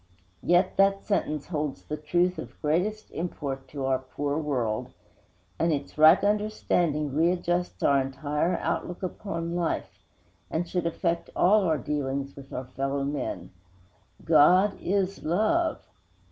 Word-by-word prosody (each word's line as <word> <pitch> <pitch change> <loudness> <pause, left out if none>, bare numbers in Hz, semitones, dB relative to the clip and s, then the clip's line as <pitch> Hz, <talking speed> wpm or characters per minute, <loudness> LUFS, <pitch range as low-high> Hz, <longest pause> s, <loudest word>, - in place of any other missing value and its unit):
Yet 175 +2 +2
that 195 0 +3
sentence 155 -8 -1
holds 150 -4 -3
the 150 - -4
truth 175 +4 0
of 120 0 -9
greatest 180 +8 -1
import 140 -6 -4
to 140 -1 -5
our 130 -1 +1
poor 140 +2 -3
world; 125 -8 -2 0.7
and 165 0 +2
its 145 -2 -3
right 155 +5 +7
understanding 180 -8 0
readjusts 175 +2 0
our 140 -1 +4
entire 145 +5 -1
outlook 180 +2 -3
upon 170 -3 -4
life, 175 -2 -2 0.5
and 170 +2 -2
should 175 0 -1
affect 170 0 -1
all 200 +2 +4
our 160 -3 +2
dealings 140 0 -3
with 140 -1 -12
our 130 - -4
fellow 135 +2 -2
men: 140 0 -4 0.7
GOD 180 +6 +5
IS 195 0 0
LOVE. 220 - +1
160 Hz, 130 wpm, -27 LUFS, 140-180 Hz, 0.7 s, right